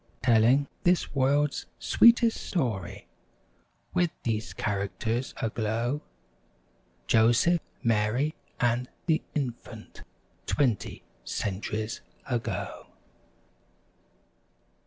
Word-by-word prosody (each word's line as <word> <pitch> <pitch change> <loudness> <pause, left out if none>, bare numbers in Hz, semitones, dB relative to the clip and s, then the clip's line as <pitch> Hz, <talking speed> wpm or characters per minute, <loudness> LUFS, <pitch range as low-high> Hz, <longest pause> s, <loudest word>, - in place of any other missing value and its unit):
Telling 120 +4 +5 0.2
this 175 -4 +2
world's 140 +2 +1
sweetest 235 -1 +5
story, 120 - -2 0.9
With 180 -2 +2
these 110 0 -2
characters 110 +4 -2
aglow— 115 +5 -1 1.0
Joseph, 120 - +4 0.2
Mary 115 +6 +1 0.3
and 120 +1 +1 0.2
the 160 -2 +2
Infant— 130 -5 -5 0.5
Twenty 125 -8 0 0.2
centuries 105 +2 -3 0.3
ago. 120 -3 -3
120 Hz, 70 wpm, -28 LUFS, 110-145 Hz, 1.0 s, Telling